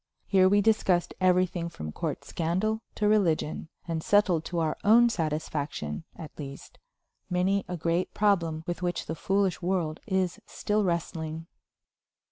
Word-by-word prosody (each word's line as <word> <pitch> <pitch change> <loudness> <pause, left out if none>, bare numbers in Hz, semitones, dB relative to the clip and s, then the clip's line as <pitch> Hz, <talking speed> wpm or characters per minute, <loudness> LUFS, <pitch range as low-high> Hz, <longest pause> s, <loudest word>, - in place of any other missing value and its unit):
Here 185 -1 +4
we 205 +1 +4
discussed 195 -5 +2
everything 180 -2 +2
from 75 - -7
court - - -4
scandal 190 +7 -1
to 210 - +1
religion, 170 -7 +1 0.2
and 165 -1 -2
settled 190 -4 +3
to 175 - -4
our 160 -2 +1
own 235 +3 +6
satisfaction, 155 - -3
at 155 - -9
least, 140 -1 -9 0.5
many 190 +2 +1
a 180 - -4
great 170 +2 0
problem 170 -7 +1
with 175 0 -4
which 175 -1 -2
the - - -3
foolish 195 +2 0
world 175 -3 -1
is 190 -3 0
still 210 0 0
wrestling. 165 -2 -2
175 Hz, 140 wpm, -28 LUFS, 160-195 Hz, 0.5 s, own